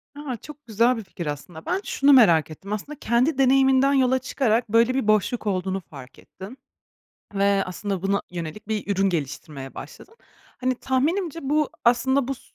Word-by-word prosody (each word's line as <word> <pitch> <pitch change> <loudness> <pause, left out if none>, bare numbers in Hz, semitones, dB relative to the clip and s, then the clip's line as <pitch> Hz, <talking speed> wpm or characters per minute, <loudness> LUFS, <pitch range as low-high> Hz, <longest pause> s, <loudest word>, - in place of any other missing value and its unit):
A, 280 -5 -5
çok 295 +5 -13
güzel 230 +3 +2
bir 225 - -6
fikir 185 -2 -8
aslında. 150 +3 -7
Ben 370 +3 -1
şunu 280 -5 +3
merak 170 - +5
ettim 195 +6 -7
aslında 285 +8 -6
kendi 255 +5 +1
deneyiminden 270 +1 +4
yola 260 -1 +3
çıkarak 235 -4 0
böyle 230 +3 +3
bir 265 -5 -1
boşluk 215 +2 +1
olduğunu 190 -1 -1
fark 135 -3 -12
ettin 195 +8 -12 0.8
ve 200 0 +2
aslında 190 0 -4
buna 200 +1 0
yönelik 175 +4 -7
bir 210 -2 -2
ürün 195 +1 +2
geliştirmeye 145 -4 -5
başladın. 455 - -11 0.4
Hani, 255 0 0
tahminimce 305 +7 -1
bu 295 +2 0
aslında 265 +2 +2
bu 275 - -1
s - - -18
230 Hz, 165 wpm, -24 LUFS, 190-265 Hz, 0.8 s, merak